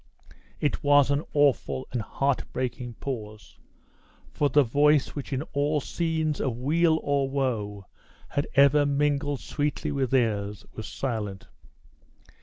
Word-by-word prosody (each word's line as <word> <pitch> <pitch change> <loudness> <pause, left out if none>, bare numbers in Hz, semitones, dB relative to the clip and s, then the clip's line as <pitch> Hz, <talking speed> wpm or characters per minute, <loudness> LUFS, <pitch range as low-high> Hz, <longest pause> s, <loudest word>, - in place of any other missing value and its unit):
It 145 - -1
was 145 -1 +5
an 140 +2 +1
awful 140 -2 +2
and 120 - -1
heart 135 +5 -1
breaking 125 -1 -4
pause, 110 -6 -7 0.7
for 145 - +1
the 145 +2 +5
voice 145 +3 +3
which 145 -1 -7
in 135 +1 -1
all 145 +1 +1
scenes 160 -1 -1
of 120 -4 -1
weal 160 +5 +2
or 140 -1 +1
woe 110 -8 -2 0.4
had 145 - -1
ever 140 +1 +6
mingled 145 -1 0
sweetly 150 +1 -2
with 135 -3 0
theirs, 105 -5 0
was 110 - -7
silent. 105 -7 -4
140 Hz, 130 wpm, -26 LUFS, 120-145 Hz, 0.7 s, ever